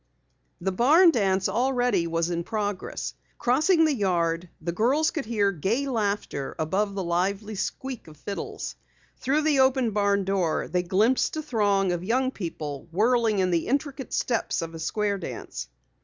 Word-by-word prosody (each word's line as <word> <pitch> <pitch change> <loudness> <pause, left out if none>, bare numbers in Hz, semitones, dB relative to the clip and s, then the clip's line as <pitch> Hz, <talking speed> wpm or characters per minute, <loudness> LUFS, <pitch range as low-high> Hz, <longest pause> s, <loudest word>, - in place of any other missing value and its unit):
The 190 +2 -1
barn 310 - +6
dance 195 -7 +1
already 245 -4 +1
was 165 +1 0
in 170 0 -1
progress. 205 -1 -3 0.2
Crossing 315 +7 +3
the 310 - +2
yard, 175 -6 0
the 170 +1 -3
girls 260 - +2
could 310 - -3
hear 210 -3 +1
gay 200 - -1
laughter 205 - -2
above 195 +6 0
the 195 - -2
lively 195 +5 -1
squeak 255 +4 -4
of 155 -1 -13
fiddles. 200 +6 -5 0.4
Through 285 +4 +1
the 300 -3 +3
open 260 -3 +3
barn 200 -1 +2
door 185 -4 0
they 180 +1 0
glimpsed 210 - +2
a 310 - -3
throng 205 -8 +1
of 175 0 -2
young 255 +6 +1
people 155 - -6
whirling 225 +3 +2
in 185 -1 +2
the 170 -2 0
intricate 280 -1 -2
steps 235 -7 0
of 165 0 -6
a 165 - -7
square 200 +4 -1
dance. - - -6
205 Hz, 160 wpm, -26 LUFS, 180-250 Hz, 0.4 s, barn